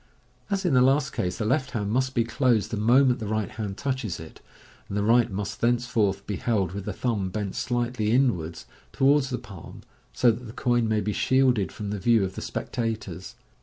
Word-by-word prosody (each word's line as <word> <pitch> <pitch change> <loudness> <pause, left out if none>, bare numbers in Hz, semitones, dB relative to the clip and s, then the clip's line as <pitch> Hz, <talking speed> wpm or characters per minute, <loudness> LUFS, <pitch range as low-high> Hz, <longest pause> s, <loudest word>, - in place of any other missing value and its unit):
As 195 -1 -1
in 170 - +2
the 125 - +5
last 135 +2 +3
case, 90 0 -2
the 105 - -2
left 130 +3 +1
hand 105 -2 -3
must 130 +2 0
be 120 - +3
closed 115 -4 +1
the - - -1
moment 125 +4 +4
the 110 - -4
right 110 -1 -2
hand 105 -3 -5
touches 130 -9 -3
it; 80 0 -11 0.5
and 100 - -4
the 100 - +1
right 115 +2 +4
must 100 +1 -5
thence 120 +1 +2
forth 100 -5 0
be 105 - -3
held 100 -7 0
with 100 0 -6
the - - -2
thumb 105 -7 -1
bent 100 0 -3
slightly 120 -3 -1
inwards 110 -10 +1 0.3
towards 135 0 +3
the 125 - -2
palm, 110 -8 -11 0.3
so 120 - +4
that 120 +3 -7
the 110 - -9
coin 120 -3 +1
may 110 -1 +1
be 105 +1 -2
shielded 130 -6 +2
from 105 -1 -5
the 105 - -3
view 115 +1 +3
of 95 0 -3
the - - -6
spectators. 110 -7 -4
115 Hz, 210 wpm, -26 LUFS, 100-125 Hz, 0.5 s, the